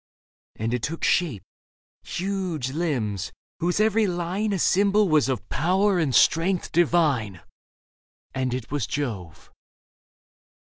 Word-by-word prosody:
And 115 +2 -3
it 125 - -1
took 165 +7 -4
shape 145 - +1 0.4
— - - -61
huge 180 -8 -2
limbs, 130 - -2 0.3
whose 175 +3 0
every 220 0 +3
line 180 +4 -2
A 195 - 0
symbol 200 +3 +3
was 150 -6 +3
of 130 -5 -3
power 185 +5 +2
and 145 -6 0
strength 175 +3 +3
divine, 150 - +1 0.9
And 130 -1 -1
it 130 -3 -7
was 145 -1 -1
Jove. 105 - -5
165 Hz, 125 wpm, -24 LUFS, 130-185 Hz, 0.9 s, every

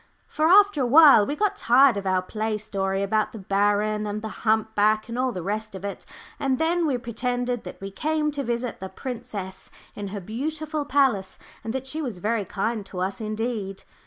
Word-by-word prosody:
For 310 +1 +1
after 400 -3 +6
a - - +2
while 285 -6 +8
we 290 - -2
got 410 +3 +1
tired 260 - +5
of 200 -1 -3
our 185 -1 +1
play 215 +2 -2
story 195 -2 -2
about 215 +2 0
the - - -7
baron 205 +2 +1
and 210 +1 -4
the 220 - -4 0.2
humpback 215 0 +2
and 235 +1 -4
all 255 0 +1
the 180 -6 -5
rest 215 +2 -3
of 190 +1 -7
it, 200 - -6 0.3
and 265 -1 +1
then 335 +2 +1
we 265 -4 +1
pretended 245 +1 -2
that - - -9
we 195 0 -7
came 305 +6 -1
to 285 -1 -3
visit 235 0 -3
the 190 - -6
princess 195 -4 -7 0.2
in 205 -1 -6
her 200 +1 -5
beautiful 300 - -4
palace, 255 -9 +1 0.3
and 225 - -3
that 265 0 -3
she 300 +4 -4
was 245 -10 -4
very 210 +3 -1
kind 215 +4 -2
to 185 - -7
us 190 +5 -2
indeed. 215 -2 -3
220 Hz, 200 wpm, -25 LUFS, 200-265 Hz, 0.3 s, while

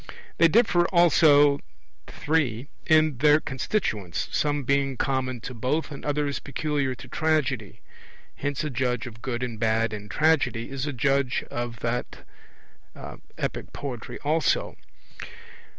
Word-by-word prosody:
They 165 - +7
differ 180 -3 +3
also 145 -5 +5 0.5
(3) 140 -6 -1 0.2
in 155 -4 +4
their 150 +1 +5
constituents, 115 - -2
some 145 -1 0
being 140 0 +1
common 130 -2 -1
to 125 - -7
both 135 +7 -2
and 140 - -8
others 145 -1 -1
peculiar 140 -2 -2
to - - -12
Tragedy 145 -9 -1 0.6
hence 145 0 -2
a 150 - -3
judge 125 -1 -1
of 115 -2 -10
good 125 -1 -3
and 115 -3 -5
bad 110 0 +1
in 105 0 -7
Tragedy 145 -4 +1
is 135 +1 -3
a - - -1
judge 135 0 +1
of 120 -1 -4
that 120 +1 -3 0.7
in - - -10 0.2
epic - - -4
poetry 120 -3 -6
also. 160 - +1
135 Hz, 135 wpm, -25 LUFS, 120-150 Hz, 0.7 s, They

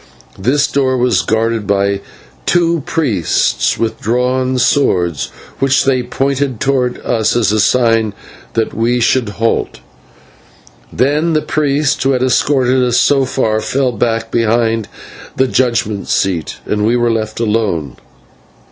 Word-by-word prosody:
This 140 +9 +2
door 130 -2 0
was 120 -6 +2
guarded 110 -1 -1
by 100 0 +1 0.5
two 170 -2 +2
priests 115 - 0
with 115 -1 -2
drawn 125 +3 0
swords, 90 - +1 0.3
which 135 0 +2
they 130 -2 +2
pointed 135 0 -2
towards 130 -2 0
us 115 -2 0
as 110 -5 +2
a 110 - +1
sign 115 -1 +2 0.4
that 115 -1 0
we 120 +2 0
should 120 -1 +1
halt. 115 +3 -1 1.1
Then 150 +5 +1
the 155 - +1
priests 145 -1 0
who 135 +1 +2
had 130 -1 0
escorted 130 0 +2
us 125 -1 +1
so 135 -2 +3
far 110 -5 0
fell 130 +2 0
back 115 0 -1
behind 115 -1 +1 0.5
the 130 - +2
judgment 115 -6 0
seat, 90 -5 -1
and 105 0 -1
we 115 +3 +2
were 120 -1 +1
left 110 -1 -3
alone. 105 - -1
120 Hz, 135 wpm, -15 LUFS, 110-130 Hz, 1.1 s, so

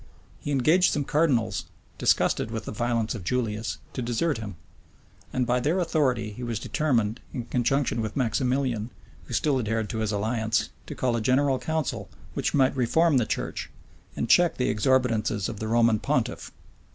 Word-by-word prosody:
He - - -6
engaged 155 +7 +4
some 145 - 0
cardinals, 140 -6 +1 0.3
disgusted - - +2
with 110 -1 -5
the - - -5
violence 115 0 -1
of 110 -7 -6
Julius, 110 +1 -1 0.2
to 130 - -3
desert 120 +4 0
him; 105 -4 -6 0.8
and 130 -1 0
by 125 +1 +2
their 150 +8 +1
authority 130 -10 +1
he 105 - -9
was 120 -2 -2
determined, 115 -3 0 0.2
in 120 -3 -3
conjunction 125 +1 0
with 110 -1 -4
Maximilian, 125 -2 0 0.4
who - - -8
still 140 -3 +2
adhered 110 -3 -1
to 110 - -3
his 110 -1 0
alliance, 110 +2 0 0.2
to - - -6
call 125 -2 0
a 115 - -1
general 130 +3 +2
council, 135 - -2 0.2
which - - -1
might 135 -2 +3
reform 145 +5 +3
the 120 - +1
church, - - -3 0.5
and 115 - -2
check 175 +7 +4
the 125 - +1
exorbitances 115 -3 +1
of 105 - -6
the 110 - -3
Roman 115 -1 +3
pontiff. - - -1
120 Hz, 170 wpm, -26 LUFS, 110-135 Hz, 0.8 s, engaged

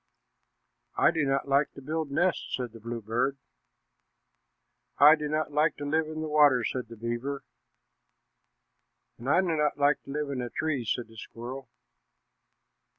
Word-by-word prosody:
"I - - +5
do 160 -4 0
not 135 +1 0
like 140 +1 +2
to - - -11
build 155 +1 -2
nests," 175 +5 0
said 125 -3 -4
the 115 - -12
bluebird. 115 +4 -2 1.6
"I 150 +2 +9
do 150 -1 -1
not 155 0 -1
like 150 +1 +2
to 145 - -5
live 155 +2 +1
in 155 0 -5
the 155 - -3
water," 145 -5 +5
said 125 -2 -3
the 115 - -10
beaver. 120 +5 -4 1.8
"And 125 +4 -4
I 170 - +5
do 175 -4 0
not 150 -1 +1
like 145 0 +3
to - - -13
live 150 0 -2
in 130 -2 -2
a 120 - -4
tree," 145 -5 -2
said 120 +2 -2
the 115 0 -17
squirrel. 125 +4 -8
140 Hz, 160 wpm, -28 LUFS, 120-150 Hz, 1.8 s, I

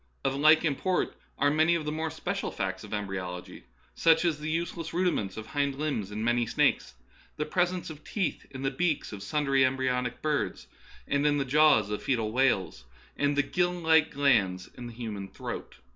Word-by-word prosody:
Of 135 - +2
like 155 +3 +5
import 175 +5 0 0.2
are 145 +1 +3
many 160 +3 +3
of 160 -3 -2
the 150 - -1
more 160 +1 -2
special 180 +5 -3
facts 95 -1 -3
of 105 - -11
embryology, 95 -4 -5 0.3
such 165 +1 +4
as 160 -3 +1
the 150 +1 -4
useless 165 0 -3
rudiments 175 - 0
of 110 - -6
hind 140 +2 -1
limbs 140 -9 -2
in 105 +1 -3
many 120 0 +2
snakes, 60 - +1 0.4
the 150 - -1
presence 180 +1 0
of 150 -1 -11
teeth 195 -6 -3
in 130 0 -8
the 135 - +1
beaks 155 -4 -1
of 100 - -7
sundry 140 +4 +1
embry 130 0 +2
onic 125 -1 -2
birds 150 -2 -1 0.4
and 140 0 +1
in 145 0 +2
the 140 - 0
jaws 140 -6 +4
of 105 - -2
foetal 115 -5 0
whales, 115 - +1 0.3
and 145 0 0
the 145 - +4
gill 180 +4 0
like 160 -3 +3
glands 105 - +2
in 120 - -7
the 120 - -9
human 110 -4 -5
throat. - - -7
140 Hz, 190 wpm, -28 LUFS, 115-155 Hz, 0.4 s, like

